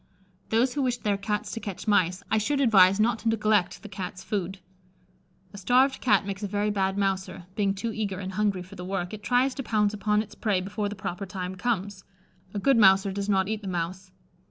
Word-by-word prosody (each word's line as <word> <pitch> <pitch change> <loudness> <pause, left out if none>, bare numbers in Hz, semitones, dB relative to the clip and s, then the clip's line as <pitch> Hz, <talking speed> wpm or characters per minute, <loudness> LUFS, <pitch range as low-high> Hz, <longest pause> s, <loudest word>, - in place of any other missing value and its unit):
Those 240 +3 +2
who 290 - -1
wish 250 -2 0
their 210 -3 0
Cats 210 +1 -3
to 230 - -4
catch 200 -1 -7
mice, 185 -2 +2
I 220 - +3
should 280 +7 0
advise 195 -6 +5
not 225 +1 +2
to 230 - 0
neglect 215 -4 +1
the - - -7
Cat's 185 -2 -6
food. 195 -2 -3 1.0
A 200 - -8
starved 255 +6 +3
Cat 205 -5 +3
makes 200 0 -5
a 205 - -2
very 205 +1 0
bad 195 -1 0
mouser; 190 -2 -2
being 200 -2 0
too 225 +3 -3
eager 205 -4 -3
and 190 0 -5
hungry 200 -2 0
for 185 +2 -14
the 180 -2 -8
work, 180 -1 -3
it 210 - -7
tries 250 +5 +2
to 270 - -5
pounce 210 -4 +1
upon 210 +1 +1
its 210 - -15
prey 205 -5 0
before 205 +2 -3
the 205 - -6
proper 190 0 -5
time 185 0 -5
comes. 200 -2 -2 0.5
A 205 - -5
good 270 +5 +3
mouser 195 -2 +5
does 200 +1 -3
not 190 -2 +2
eat 215 0 -3
the 200 - -7
mouse. 180 +1 -4
205 Hz, 220 wpm, -26 LUFS, 190-215 Hz, 1.0 s, advise